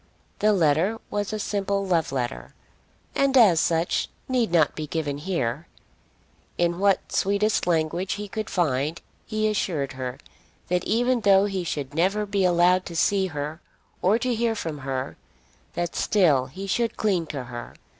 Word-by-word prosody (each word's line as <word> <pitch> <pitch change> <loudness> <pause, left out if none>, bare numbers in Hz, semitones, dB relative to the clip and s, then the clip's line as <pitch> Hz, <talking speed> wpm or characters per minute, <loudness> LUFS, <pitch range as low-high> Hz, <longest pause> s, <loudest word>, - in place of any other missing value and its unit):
The 215 - +4
letter 180 +4 +2
was 205 0 -2
a 215 - -2
simple 200 -1 -1
love 170 -6 +1
letter, 120 - -4 0.6
and 275 -1 +2
as 200 -9 +6
such 165 +1 +1 0.2
need 245 -7 +1
not 160 -4 +3
be 155 -1 -4
given 145 -2 -3
here. 150 -3 -2 0.9
In 175 0 +1
what 200 -1 +2
sweetest 200 0 +1
language 170 +2 0
he 210 0 -5
could 215 +1 -5
find 155 -2 0 0.3
he 215 0 0
assured 165 -10 -1
her 130 -1 -5 0.5
that 180 0 +1
even 245 +2 +1
though 195 -1 +5
he 195 -3 -2
should 145 -5 -4
never 195 +6 +1
be 200 -1 0
allowed 180 +1 +4
to 170 - -7
see 190 +4 +2
her 150 0 -5 0.4
or 200 +5 +4
to 250 +1 -1
hear 230 0 0
from 160 -8 -4
her, 130 -1 -4 0.6
that 175 -1 -2
still 150 -11 +3
he 190 +9 -7
should 230 +4 -1
cling 185 -6 +1
to 140 -4 -5
her. 120 -1 -8
180 Hz, 160 wpm, -25 LUFS, 155-205 Hz, 0.9 s, as